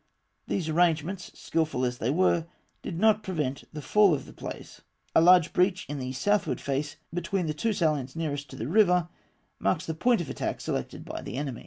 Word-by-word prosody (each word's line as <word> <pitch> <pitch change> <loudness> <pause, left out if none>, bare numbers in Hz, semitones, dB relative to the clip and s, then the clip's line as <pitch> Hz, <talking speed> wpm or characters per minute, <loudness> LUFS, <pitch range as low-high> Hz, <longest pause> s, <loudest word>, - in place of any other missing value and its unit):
These 180 -5 -1
arrangements, 170 +2 +1
skilful 155 -6 0
as 125 0 -3
they 115 - 0
were, 170 +1 +2 0.3
did 165 - -5
not 215 0 +4
prevent 150 -9 -3
the 150 -2 -7
fall 205 -6 +5
of - - -6
the - - -13
place. - - -8 0.3
A - - +6
large 175 -1 +6
breach 185 +1 +2
in 145 0 -4
the 130 0 -4
southward 205 +9 0
face, 140 +1 -2 0.2
between 175 +2 -1
the 155 - -1
two 220 +10 0
salients 155 -8 0
nearest 145 -4 -3
to 130 - -9
the 115 -2 -4
river, 180 -1 +4 0.5
marks 180 0 0
the 160 - -2
point 240 +8 +2
of 170 - -3
attack - - -3
selected - - -4
by - - -6
the - - -6
enemy. 135 -4 -3
165 Hz, 195 wpm, -28 LUFS, 145-185 Hz, 0.5 s, A